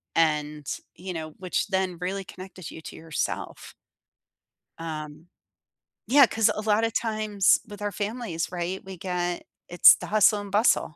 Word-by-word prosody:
and 150 -2 +1 0.3
you 185 +1 -7
know, 155 -1 -6
which 185 -1 -1
then 190 -2 -1
really 195 +2 -2
connected 185 -2 -10
you - - -9
to - - -10
yourself. 160 -1 -4 1.1
Um, 155 0 -7 0.8
yeah, 275 +2 +7
'cause 225 -2 +2
a 215 - -3
lot 215 0 +2
of 225 -1 0
times 215 -4 +2
with 205 -1 -10
our 205 0 -2
families, 205 -4 -3
right, 180 +1 -4
we 190 -1 -9
get 175 -1 -2 0.2
it's 175 - +8
the - - -8
hustle 210 0 +4
and 200 -1 -9
bustle. 205 -6 +2
185 Hz, 155 wpm, -26 LUFS, 165-210 Hz, 1.1 s, it's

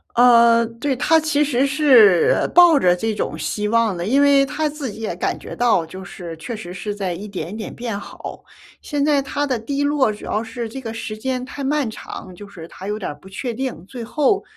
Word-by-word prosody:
呃， 235 -1 +6
对， 250 +4 -3
他 320 +5 +3
其 300 -1 +1
实 270 -2 +1
是 260 - +5
抱 345 -3 +7
着 180 -7 +3
这 220 +4 -2
种 - - -3
希 210 0 -2
望 225 -3 +2
的， 170 - -4
因 260 +8 +2
为 280 -1 +5
他 305 +3 -1
自 290 -4 -5
己 215 - -10
也 220 -6 -3
感 175 - -2
觉 - - -9
到 230 -8 +2
就 185 +4 -9
是 170 -3 -8
确 180 +8 -6
实 175 -4 -8
是 205 +3 -4
在 195 -3 -3
一 195 +5 -7
点 185 -3 -5
一 - - -6
点 220 - -6
变 235 -4 -4
好。 - - -9 0.4
现 290 -1 -1
在 290 -2 +3
他 285 +1 -2
的 255 -4 -1
低 280 +6 -2
落 285 -5 +2
主 210 - -11
要 215 - -1
是 230 0 -5
这 265 +5 -7
个 225 -3 -6
时 225 -1 -6
间 255 +2 -3
太 280 +2 -7
漫 280 -1 0
长， 190 -3 -9
就 205 +3 -11
是 170 -5 -10
他 190 +3 -9
有 210 +1 -2
点 205 - -4
儿 - - -10
不 165 +6 -16
确 235 +5 -5
定， 250 -8 -4
最 245 +3 -8
后， 300 - +1
230 Hz, 250 characters per minute, -20 LUFS, 205-275 Hz, 0.4 s, 抱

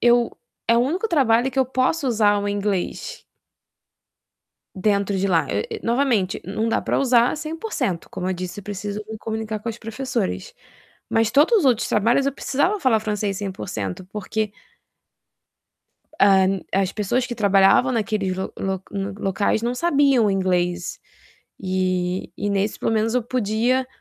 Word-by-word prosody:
eu 240 0 +3 0.3
é 230 - +5
o - - +4
único 345 - 0
trabalho 260 - +3
que 265 - -4
eu 260 - +3
posso 260 +4 0
usar 210 -4 +3
o 205 - -1
inglês 200 -2 -2 1.5
dentro 200 0 +1
de 195 +1 0
lá, 170 -3 +2
e 100 +1 -2
e - - -10
novamente 235 -6 +1
não 215 +5 -2
dá - - 0
para - - 0
usar 245 0 +3
100%, 310 - -3
como 185 0 -4
eu - - +1
disse, 180 +1 -6
eu 205 - -8
preciso 205 +1 -5
me 220 - -6
comunicar 220 0 -4
com 230 - -5
as 230 0 -5
professoras. 225 - -3 0.6
Mas 225 -1 +2
todos 300 - +5
os 360 - 0
outros 250 -5 +3
trabalhos, 235 +6 +2
eu 275 - +1
precisava 290 +10 0
falar 250 -8 +3
francês 210 -2 -2
100%, 185 - -5
porque 215 0 -2 1.7
hã, 195 -1 +4
as 195 -1 +1
pessoas 230 +5 0
que 245 - -5
trabalhavam 200 +3 +4
naqueles 210 -4 -1
lo 190 - -4
lo 190 -1 -2
lo 200 0 -4
locais 200 +3 0
não 240 +1 -1
sabiam 275 -5 +3
o - - +2
inglês, 180 -2 0 0.6
e 185 -1 -1
e 205 - -2
nesse, 200 +1 0
pelo - - 0
menos, 225 +1 +1
eu 250 - +2
podia 245 +2 0
215 Hz, 160 wpm, -22 LUFS, 195-250 Hz, 1.7 s, é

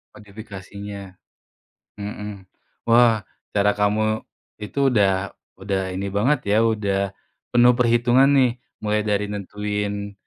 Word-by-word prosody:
Modifikasinya. 100 -1 -9 0.9
Mhm, 105 -1 -7 0.4
wah 115 -3 +4 0.3
cara 105 0 +3
kamu 110 +1 +1 0.4
itu 105 +6 -5
udah 100 -2 +2 0.3
udah 95 0 -1
ini 95 +2 -3
banget 130 +7 +2
ya, - - +4
udah 105 -4 +1 0.5
penuh 120 0 +6
perhitungan 120 +2 +4
nih. 130 -3 +4 0.3
Mulai 105 0 0
dari 105 0 +1
nentuin 105 0 -4
105 Hz, 105 wpm, -22 LUFS, 100-115 Hz, 0.9 s, penuh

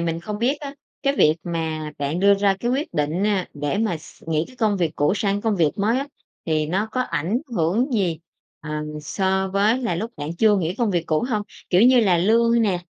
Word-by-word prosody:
mình 165 0 -2
không 210 +4 -5
biết 265 +6 0
á 280 -1 -7 0.3
cái 275 -1 +2
việc 155 -6 +4
mà 160 -2 -3
bạn 145 +5 -2
đưa 200 0 +6
ra 200 0 +2
cái 240 - 0
quyết 275 +4 -2
định, 155 +6 0
a, 200 -4 0
để 145 +4 -2
mà 215 -6 0
x 155 - -16
nghĩ 160 0 0
cái 255 - -17
công 215 -4 +1
việc 170 -5 0
cũ 145 +5 +2
sang 200 0 0
công 215 -2 0
việc 160 -4 +3
mới 220 +5 +2
á, 280 - -3 0.4
thì 155 -1 +1
nó 190 +7 0
có 255 - -1
ảnh 195 -2 -1 0.2
hưởng 205 - +1
gì, 180 -8 0 0.4
ờ, 150 -1 -8 0.3
so 190 +4 0
với 205 +5 +2
là 230 -8 0
lúc 220 +7 -3
bạn 150 +3 -5
chưa 210 0 +4
nghỉ 175 0 -1
công 235 -4 0
việc 175 -3 -1
cũ 155 +7 +1
không? 215 -4 0 0.3
Kiểu 180 +3 +5
như 250 0 +6
là 185 -6 +3
lương 230 +4 +3
nè, 195 -5 +1
195 Hz, 230 wpm, -22 LUFS, 165-225 Hz, 0.4 s, đưa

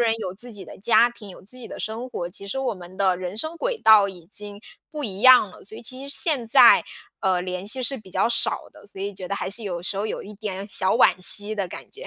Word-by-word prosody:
人 230 -2 +2
有 185 -5 -5
自 240 +6 -4
己 205 -4 -7
的 - - -12
家 230 +3 +4
庭， 220 -3 -13
有 185 - -12
自 250 +7 -4
己 240 - -9
的 - - -9
生 225 +4 -5
活， 175 - -5
其 200 +2 -7
实 265 - -3
我 250 -5 -2
们 180 0 -12
的 190 -2 +1
人 185 +2 -6
生 315 +8 -2
轨 - - -2
道 215 -2 +7
已 180 -3 -10
经 205 +2 -9 0.3
不 300 -2 -5
一 200 -3 -4
样 255 -5 +7
了， - - -14
所 215 - -10
以 - - -11
其 255 +3 -5
实 280 - -2
现 280 -9 +1
在， - - +7 0.4
呃， 185 -3 +1
联 185 +1 -5
系 255 +3 +1
是 260 +2 +2
比 190 -3 -16
较 190 +3 +1
少 - - 0
的， - - -17
所 195 - -7
以 200 +1 -3
觉 185 -2 -8
得 200 - -2
还 - - -4
是 225 +3 -1
有 175 -4 -5
时 195 +2 -2
候 210 - -2
有 - - -5
一 210 - -10
点 200 -2 -5
小 190 -2 0
惋 - - +5
惜 205 +3 +5
的 200 -3 -3
感 - - -9
觉。 - - -10
205 Hz, 300 characters per minute, -23 LUFS, 190-235 Hz, 0.4 s, 道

